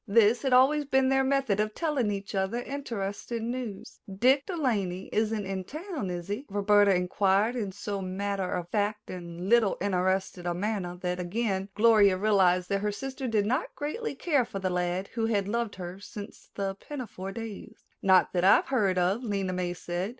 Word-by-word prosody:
This 220 +2 +4
had 270 - 0
always 275 +4 +5
been 265 -1 +3
their 270 0 +3
method 265 -7 +1
of 215 0 -1
telling 295 -9 0
each 200 +1 -4
other 190 +4 0
interesting 230 -3 -4
news. 245 -6 -6
"Dick 260 +8 +3
De 360 - -3
Laney 195 - -1
isn't 215 -1 0
in 190 -1 -3
town, 310 - -5
is 175 -1 -5
he?" 210 +8 -4
Roberta 205 0 +4
inquired 195 +5 +2
in 210 -5 -2
so 200 +1 -4
matter 190 0 -2
of 175 -2 -2
fact 210 +1 -1
and 175 0 -7
little 225 -2 +4
interested 185 -1 0
a 175 - -1
manner 185 -2 -2
that 180 0 -1
again 195 +1 -1
Gloria 210 -4 +5
realized 185 -3 +3
that 200 0 0
her 210 0 0
sister 265 +4 -5
did 215 -3 +1
not 255 +9 -1
greatly 305 - -4
care 285 -2 +2
for 215 - -7
the 190 -1 -1
lad 180 +2 -1
who 225 -1 -1
had 200 -3 0
loved 230 0 -2
her 180 0 -7
since 205 0 -10
the 195 -1 -2
pinafore 200 -4 -7
days. 225 -2 -8 0.2
"Not 190 -1 +4
that 180 -1 +1
I've 190 - +5
heard 205 -8 +2
of," 185 +7 +1
Lena 195 -4 -1
May 180 -1 -2
said. 175 +3 -3
205 Hz, 185 wpm, -28 LUFS, 190-235 Hz, 0.2 s, always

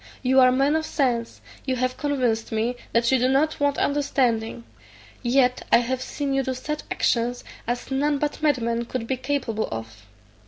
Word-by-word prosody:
You 260 +1 +4
are 255 -1 +7
men 275 +4 +2
of 315 0 -1
sense, 240 -4 -1 0.2
you 260 -2 -1
have 255 0 -1
convinced 250 -6 -1
me 225 +3 0 0.2
that 235 +1 +2
you 260 - +4
do 250 +2 +2
not 295 +4 +2
want 285 0 +1
understanding; 245 -6 0 0.6
yet, 250 0 +2
I - - +8
have 250 +2 -1
seen 275 +1 -3
you 270 - +2
do 260 -1 -2
such 300 +4 -4
actions 240 +1 0 0.2
as 245 +3 -3
none 285 +2 +1
but 295 +2 -2
madmen 235 -6 +1
could 235 -1 -4
be 265 - -1
capable 255 -4 -2
of. 110 -2 -7
255 Hz, 180 wpm, -24 LUFS, 235-275 Hz, 0.6 s, I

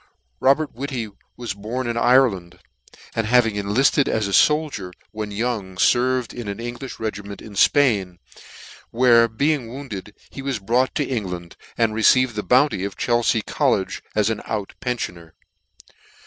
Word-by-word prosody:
ROBERT 140 +3 +2
WHITTY 125 -3 -4 0.3
was 120 -5 -4
born 110 +6 -4
in 120 0 -2
Ireland, 115 -8 +2 0.6
and 115 -1 -1
having 120 -2 +4
enlifted 105 +8 +2
for - - 0
a 105 -3 -1
foldier 150 -12 +2 0.2
when 105 -1 -5
young, 105 -3 -3
ferved 125 +4 +2
in 120 -3 -7
an 100 - -4
Englifh 120 +3 -7
regiment 100 -2 -5
in 105 -2 -11
Spain, 100 -8 +3 0.7
where 115 -1 +5
being 140 +3 0
wounded, 115 -6 -8 0.2
he 135 - -7
was 135 -3 -2
brought 120 +6 0
to 145 - 0
England, 90 -9 -4 0.2
and 115 -2 +2
re 110 - -2
ceived 130 +2 +4
the 105 - -3
bounty 125 -4 +2
of 100 -1 -5
Chelfea 120 -2 +1
college - - 0
as 105 +1 +2
an 110 - -3
out 105 -3 -3
penfioner. 90 -10 -4
115 Hz, 150 wpm, -22 LUFS, 100-130 Hz, 0.7 s, where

